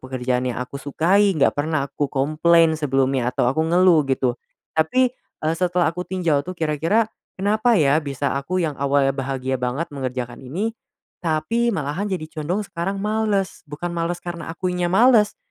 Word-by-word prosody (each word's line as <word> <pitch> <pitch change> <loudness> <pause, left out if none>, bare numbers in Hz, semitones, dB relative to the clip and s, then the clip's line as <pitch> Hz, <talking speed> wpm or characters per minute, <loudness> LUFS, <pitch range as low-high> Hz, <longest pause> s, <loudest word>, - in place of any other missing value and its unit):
pekerjaan 125 -1 -2
yang 120 - -3
aku 140 +2 -6
sukai, 185 +7 +2
nggak 140 - +3
pernah 145 -1 -1
aku 140 +1 -2
komplain 160 +4 +3
sebelumnya 135 -4 +1
atau 125 - 0
aku 135 +6 +1
ngeluh." 165 -3 +4
gitu. 130 -2 0 0.3
Tapi, 250 +10 +2
eee, 160 -9 -5
setelah 180 -2 +1
aku 180 +1 -6
tinjau 170 -6 +1
tuh, 180 +4 -7
kira-kira 165 +8 +1 0.3
kenapa 215 +4 +2
ya, 150 -2 +3
bisa 140 -1 -2
aku 140 +7 -2
yang 155 - -1
awalnya 140 -1 +2
bahagia 130 -1 -3
banget 135 +6 -2
mengerjakan 125 -3 -4
ini, 185 - -3 0.5
tapi 175 +9 0
malahan 180 +1 -2
jadi 185 -5 -3 0.2
condong 180 +8 -1
sekarang 190 +1 -3
males, 210 -3 0
bukan 170 +4 -5
males 170 +1 -1
karena 170 -2 -6
akunya 180 +1 -2
males, 215 +2 +4
160 Hz, 160 wpm, -22 LUFS, 140-185 Hz, 0.5 s, ngeluh